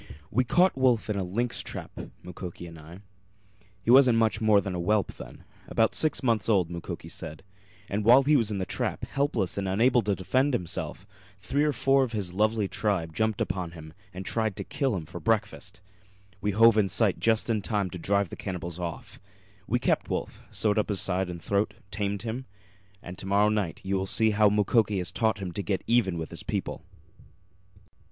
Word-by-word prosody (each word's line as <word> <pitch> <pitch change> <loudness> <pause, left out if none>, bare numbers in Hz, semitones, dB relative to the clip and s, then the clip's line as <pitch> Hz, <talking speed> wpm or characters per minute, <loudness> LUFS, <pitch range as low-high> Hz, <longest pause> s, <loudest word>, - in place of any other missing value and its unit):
We 130 - +2
caught 180 +9 +3
Wolf 125 -5 +2
in - - -1
a 100 - -1
lynx 115 +7 -1
trap, - - -6 0.3
Mukoki 90 -1 -8
and 85 -1 -11
I. 80 +5 -12 0.8
He 115 - +2
wasn't 130 -3 +7
much 110 -1 +1
more 110 -2 +5
than 100 -1 -4
a 90 - -3
whelp 105 +3 +1
then - - -11 0.2
about 110 -1 +2
six 155 -2 +1
months 115 -3 +1
old, 95 -6 +2
Mukoki 85 -1 -6
said. 80 +5 -7 0.4
And 105 +2 -2
while 125 +5 +7
he 150 +2 +4
was 115 -6 +2
in 105 - -2
the 95 - -2
trap, - - -3
helpless 120 - -1
and 95 - -2
unable 120 +6 +3
to 100 -2 0
defend 130 - +1
himself, 90 0 -4 0.3
three 140 +8 0
or 150 - +2
four 135 0 +3
of 120 -3 -4
his 95 -5 -3
lovely 110 +1 +1
tribe 95 -3 -1
jumped 110 +2 0
upon 90 -2 -2
him 80 -2 -11 0.2
and 95 +1 -7
tried 110 -3 0
to - - -4
kill 135 -6 -1
him 85 -4 -4
for 85 +2 -8
breakfast. 105 -3 -2 0.6
We 105 - 0
hove 110 +2 +5
in 100 -2 +2
sight 100 +1 +1
just 115 -1 +2
in 110 -3 0
time 100 -3 -1
to 90 - -7
drive 100 +1 +1
the - - -7
cannibals 90 -3 -6
off. 85 -2 -6 0.5
We - - +2
kept - - 0
Wolf, - - -4
sewed 105 0 +1
up 105 - -1
his 100 -2 +1
side 95 0 +1
and 85 -1 -6
throat, 100 +4 -1 0.2
tamed 100 0 -2
him 120 +3 -5 0.6
and 90 +1 -8
to 95 - -5
morrow 100 +2 +3
night 105 -6 -2
you 95 +1 0
will 95 0 -2
see 110 +2 +4
how 105 0 +4
Mukoki 105 0 +2
has 90 -2 -3
taught 110 -1 +1
him 95 -3 -5
to 100 - -4
get 95 -2 -2
even 115 -7 +2
with 80 -1 -5
his - - -4
people." - - -4
105 Hz, 205 wpm, -27 LUFS, 95-115 Hz, 0.8 s, wasn't